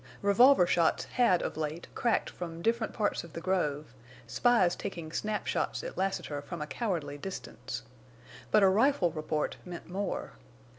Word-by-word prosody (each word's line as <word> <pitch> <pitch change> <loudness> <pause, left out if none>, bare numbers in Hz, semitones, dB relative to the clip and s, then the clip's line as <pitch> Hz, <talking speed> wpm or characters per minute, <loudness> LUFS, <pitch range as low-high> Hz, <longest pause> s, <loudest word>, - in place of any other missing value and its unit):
Revolver 200 +1 +6
shots 170 -2 +2
had 235 -8 +2
of - - -4
late 155 +2 -3
cracked 235 -2 +1
from 170 -1 -7
different 230 0 +1
parts 210 -2 -1
of 170 -3 -12
the - - -4
grove—spies 165 - 0
taking 170 -5 -6
snap 210 +4 -2
shots - - -1
at - - -6
Lassiter 175 -6 -2
from 170 +3 -7
a 150 - -3
cowardly 150 -3 -3
distance! 125 - -6 0.7
But 210 - +5
a - - +8
rifle 210 -2 +3
report 155 -1 -2
meant 175 -1 -8
more. 195 +1 -3
175 Hz, 150 wpm, -30 LUFS, 155-205 Hz, 0.7 s, a